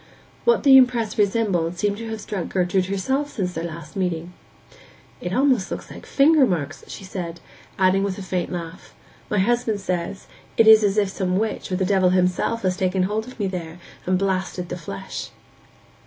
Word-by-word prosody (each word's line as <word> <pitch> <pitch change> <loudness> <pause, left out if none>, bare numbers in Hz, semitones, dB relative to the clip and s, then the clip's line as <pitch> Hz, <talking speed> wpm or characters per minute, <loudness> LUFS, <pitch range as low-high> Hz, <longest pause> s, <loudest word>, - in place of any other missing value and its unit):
What 475 - +3
the 270 -2 +8
impress 245 -4 +3
resembled 195 -5 +1
seemed 205 +1 0
to 225 0 -6
have 220 0 -4
struck 205 -4 -4
Gertrude 185 0 +1
herself 265 +10 -1
since 180 -7 -3
their 165 - -4
last 170 -2 -8
meeting. 180 -2 -2 0.9
'It 175 - -4
looks 255 -4 +2
almost - - -5
like - - -11
finger 290 -1 +5
marks,' 155 -6 -3
she - - -9
said; 175 -3 -6 0.4
adding 190 0 +3
with 195 -1 -2
a 200 - -6
faint 180 -1 -2
laugh, 170 0 -7 0.3
'my 210 - 0
husband 225 +1 +1
says 185 0 -3 0.3
it 225 - +6
is 220 0 +9
as 205 0 +1
if 205 -2 +2
some 185 -1 -1
witch, 215 -2 -2
or - - +1
the 190 0 0
devil 185 -1 +3
himself, 185 +5 +1
had 185 -1 +1
taken 185 0 +1
hold 215 +4 -2
of 255 - -12
me 205 - 0
there, 175 -3 -5 0.3
and 185 0 +3
blasted 185 -2 -2
the - - -3
flesh. 150 - -7
190 Hz, 185 wpm, -23 LUFS, 180-215 Hz, 0.9 s, is